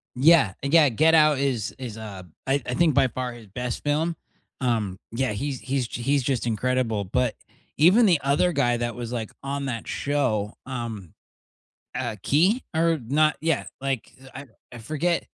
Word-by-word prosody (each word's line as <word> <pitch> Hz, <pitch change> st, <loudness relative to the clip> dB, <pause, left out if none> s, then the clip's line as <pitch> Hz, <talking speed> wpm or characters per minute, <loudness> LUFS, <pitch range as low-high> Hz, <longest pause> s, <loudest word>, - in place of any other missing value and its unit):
Yeah, 140 Hz, -, +5 dB
yeah, 150 Hz, +1 st, +5 dB
Get 155 Hz, +8 st, +3 dB
Out 155 Hz, -2 st, +5 dB
is 125 Hz, -6 st, -1 dB
is, 120 Hz, -4 st, -7 dB
uh, 105 Hz, -4 st, -8 dB, 0.2 s
I 140 Hz, +1 st, +2 dB
I 125 Hz, -, -3 dB
think 160 Hz, +3 st, +3 dB
by 135 Hz, -1 st, +4 dB
far 125 Hz, +1 st, -4 dB
his 115 Hz, -3 st, -13 dB
best 125 Hz, +5 st, -4 dB
film. 155 Hz, +3 st, 0 dB, 0.5 s
Um, 110 Hz, -7 st, 0 dB
yeah, 125 Hz, +2 st, -1 dB
he's 135 Hz, +5 st, -3 dB
he's 130 Hz, -2 st, -2 dB
he's 135 Hz, +3 st, 0 dB
just 125 Hz, -3 st, -1 dB
incredible, 115 Hz, -1 st, 0 dB
but 125 Hz, +4 st, 0 dB, 0.4 s
even 185 Hz, +10 st, +6 dB
the 175 Hz, -7 st, +4 dB
other 145 Hz, +6 st, +2 dB
guy 125 Hz, -6 st, +2 dB
that 120 Hz, 0 st, -2 dB
was, 120 Hz, 0 st, -6 dB
like, 115 Hz, -3 st, -4 dB
on 140 Hz, 0 st, -3 dB
that 115 Hz, -4 st, -4 dB
show, 120 Hz, -8 st, -1 dB
um, 115 Hz, -, -6 dB, 0.8 s
uh, 110 Hz, -, -3 dB
Key 180 Hz, -, +3 dB
or 165 Hz, 0 st, +2 dB
not 155 Hz, +3 st, +3 dB
yeah, 165 Hz, +1 st, 0 dB
like, 135 Hz, -3 st, -3 dB, 0.2 s
I 135 Hz, +1 st, -7 dB, 0.3 s
I 120 Hz, -, -9 dB
forget. 155 Hz, +8 st, -1 dB
130 Hz, 170 wpm, -25 LUFS, 115-150 Hz, 0.8 s, even